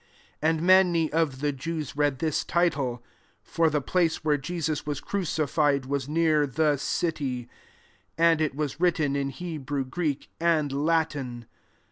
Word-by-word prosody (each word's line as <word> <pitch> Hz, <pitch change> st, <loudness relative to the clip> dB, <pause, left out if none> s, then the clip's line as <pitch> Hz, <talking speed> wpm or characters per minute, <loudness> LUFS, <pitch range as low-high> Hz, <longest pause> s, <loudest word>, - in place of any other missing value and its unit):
20 155 Hz, -, +2 dB
And 160 Hz, -, -3 dB
many 175 Hz, -4 st, +4 dB
of 155 Hz, -5 st, 0 dB
the 145 Hz, 0 st, +1 dB
Jews 150 Hz, +1 st, -5 dB
read 145 Hz, -2 st, +1 dB
this 155 Hz, -1 st, 0 dB
title; 140 Hz, -8 st, 0 dB, 0.4 s
for 165 Hz, -1 st, +1 dB
the 150 Hz, -1 st, 0 dB
place 165 Hz, +2 st, 0 dB
where 150 Hz, -1 st, +3 dB
Jesus 155 Hz, +1 st, -3 dB
was 145 Hz, -1 st, -3 dB
crucified 150 Hz, -7 st, 0 dB
was 140 Hz, 0 st, -2 dB
near 155 Hz, -2 st, +2 dB
the 150 Hz, +1 st, +1 dB
city: 140 Hz, -4 st, -2 dB, 0.7 s
and 165 Hz, -1 st, +4 dB
it 155 Hz, -3 st, 0 dB
was 145 Hz, -1 st, -3 dB
writ 175 Hz, -1 st, +3 dB
ten 145 Hz, -3 st, 0 dB
in 140 Hz, -1 st, -1 dB
Hebrew, 145 Hz, -4 st, -4 dB
Greek, 145 Hz, +1 st, -3 dB
and 165 Hz, -4 st, +2 dB
La 160 Hz, +4 st, +2 dB
tin. 125 Hz, -6 st, -7 dB
150 Hz, 155 wpm, -26 LUFS, 140-165 Hz, 0.7 s, many